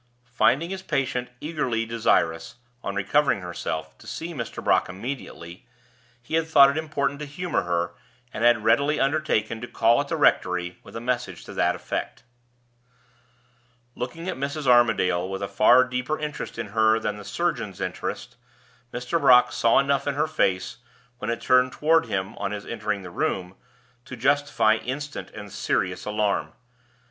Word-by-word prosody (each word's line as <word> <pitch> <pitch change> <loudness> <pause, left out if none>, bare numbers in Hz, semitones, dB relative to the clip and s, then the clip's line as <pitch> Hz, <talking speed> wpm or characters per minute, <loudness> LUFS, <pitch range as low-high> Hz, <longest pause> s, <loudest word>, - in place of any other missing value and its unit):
Finding 165 +7 +2
his 190 0 -4
patient 135 -7 -1
eagerly 130 -8 -2
desirous, 95 -8 0 0.3
on 100 - -3
recovering 105 +4 +2
herself, 80 -3 -5
to 110 - -15
see 165 +8 -5
Mr. 120 -6 -6
Brock - - +2
immediately, 95 -5 -7 0.6
he 120 - -10
had 160 0 +2
thought 140 -3 +7
it - - -6
important 145 -3 -1
to 150 - -5
humor 170 +3 -2
her, 85 0 -1 0.4
and 115 - -3
had 120 -2 +4
readily 140 +7 +3
undertaken 135 -6 0
to 120 - -5
call 115 +3 +3
at 145 - -5
the 165 - -2
rectory 90 - +1
with - - -14
a - - -3
message 120 -6 -3
to - - -9
that - - +1
effect. - - -5 1.7
Looking 130 +9 -6
at - - -3
Mrs. 140 +2 -3
Armadale 110 -8 +3
with 95 0 -4
a - - -1
far 110 +6 +5
deeper 125 +4 -2
interest 150 -5 -5
in 115 -3 -4
her 110 +1 +3
than 105 -2 -3
the 105 - -9
surgeon's - - -2
interest, - - -5 0.5
Mr. 125 +7 -2
Brock 125 -3 +6
saw 115 - +3
enough 140 0 +2
in 140 - 0
her 150 +2 +2
face, 95 -12 0 0.4
when 110 - -4
it 115 - -2
turned 125 0 +3
toward 160 +2 +3
him 95 +2 -3
on 100 - -1
his 105 -1 -6
entering 105 -3 -3
the 90 - -9
room, 90 +1 -2 0.5
to - - -8
justify 125 -3 +2
instant 145 +5 -5
and 105 -2 -10
serious - - -1
alarm. 105 -1 -1
120 Hz, 165 wpm, -25 LUFS, 105-140 Hz, 1.7 s, thought